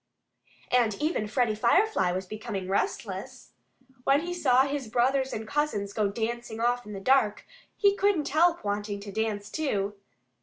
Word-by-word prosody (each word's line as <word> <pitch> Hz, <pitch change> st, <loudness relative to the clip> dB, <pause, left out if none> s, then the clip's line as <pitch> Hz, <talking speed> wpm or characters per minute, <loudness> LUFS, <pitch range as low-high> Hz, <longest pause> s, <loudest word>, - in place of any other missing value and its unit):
And 235 Hz, -4 st, +3 dB
even 300 Hz, -8 st, 0 dB
Freddie 235 Hz, 0 st, +1 dB
Firefly 235 Hz, -, +2 dB
was 185 Hz, +1 st, -3 dB
becoming 210 Hz, -1 st, -5 dB
restless. 200 Hz, -, -3 dB, 0.5 s
When 275 Hz, +3 st, +3 dB
he 350 Hz, +1 st, -4 dB
saw 265 Hz, -7 st, +4 dB
his 280 Hz, -2 st, -3 dB
brothers 260 Hz, +3 st, +1 dB
and 220 Hz, 0 st, -5 dB
cousins 215 Hz, -8 st, -1 dB
go 215 Hz, -2 st, +1 dB
dancing 225 Hz, +2 st, -4 dB
off 245 Hz, 0 st, 0 dB
in 210 Hz, -, -7 dB
the 195 Hz, -, -5 dB
dark 220 Hz, 0 st, +2 dB, 0.3 s
he 400 Hz, -1 st, +4 dB
couldn't 395 Hz, -7 st, +1 dB
help 335 Hz, +4 st, +3 dB
wanting 205 Hz, 0 st, -2 dB
to 200 Hz, 0 st, -8 dB
dance 210 Hz, -1 st, -2 dB
too. 205 Hz, -10 st, -1 dB
235 Hz, 155 wpm, -28 LUFS, 210-285 Hz, 0.5 s, saw